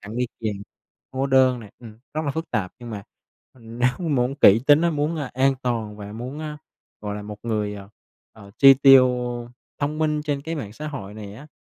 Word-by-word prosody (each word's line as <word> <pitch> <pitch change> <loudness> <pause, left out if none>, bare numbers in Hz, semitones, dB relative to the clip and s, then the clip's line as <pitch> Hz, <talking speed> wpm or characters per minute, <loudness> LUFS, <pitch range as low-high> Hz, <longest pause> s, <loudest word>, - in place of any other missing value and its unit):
tặng 105 +3 -8
đi 125 0 0
kèm, 110 -3 -2 0.6
hóa 135 +1 -1
đơn 130 -2 +4
nè 105 -2 -12
ừm, 110 -3 -13 0.2
rất 155 0 -2
là 145 - 0
phức 160 +4 -5
tạp. 100 -6 -2
Nhưng 120 -1 -9
mà, 105 -2 -6 0.5
ừm, 115 -2 -12
nếu 125 +1 +3 0.2
muốn 130 -1 +1
kỹ 110 -4 +6
tính 145 +1 +6
á, 170 - +3
muốn, 150 +1 -1
à, 145 -4 -4
an 135 +1 +3
toàn 110 -4 -2
và 105 0 -8
muốn, 125 +6 -6
a, 150 -1 -6 0.4
gọi 105 -1 -4
là 105 - -6
một 105 0 -8
người, 105 -3 -2
ờ, 100 -1 -10 0.4
ờ, 100 -2 -14
chi 135 -1 +9
tiêu 135 -1 +7 0.7
thông 150 +2 -2
minh 150 -1 0
trên 145 -2 -2
cái 160 +3 -4
mạng 110 -10 -6
xã 155 +5 -6
hội 105 -9 -7
này 105 -1 -9
á, 140 +7 -12
125 Hz, 220 wpm, -23 LUFS, 105-145 Hz, 0.7 s, chi